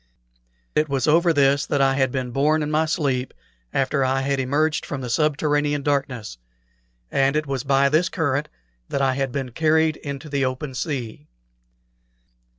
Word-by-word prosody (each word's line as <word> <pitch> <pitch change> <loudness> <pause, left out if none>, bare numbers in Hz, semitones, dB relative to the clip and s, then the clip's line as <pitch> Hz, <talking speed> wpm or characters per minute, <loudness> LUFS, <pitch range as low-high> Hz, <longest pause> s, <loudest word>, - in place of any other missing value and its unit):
It 155 0 +1
was 135 +1 0
over 170 +3 +4
this 140 -1 +3
that 145 - 0
I 135 0 +4
had 135 -1 +1
been 130 -2 -3
borne 150 +4 +2
in 150 - -3
my 155 +1 +2
sleep, 135 -5 -1 0.4
after 135 +1 +1
I 130 +1 +1
had 140 0 0
emerged 145 +4 0
from 140 - -5
the 125 -2 -4
subterranean 145 0 +1
darkness, 130 - -2 0.7
and 135 +1 +2
it 155 0 0
was 135 -3 -3
by 140 0 +3
this 155 +5 +2
current 150 -3 -1 0.4
that 140 - -1
I 130 -1 +2
had 135 -1 -2
been 130 -1 -4
carried 160 +3 +2
into 140 0 -7
the 140 -2 -1
open 130 +2 -3
sea. 125 - -4
140 Hz, 165 wpm, -23 LUFS, 135-150 Hz, 0.7 s, over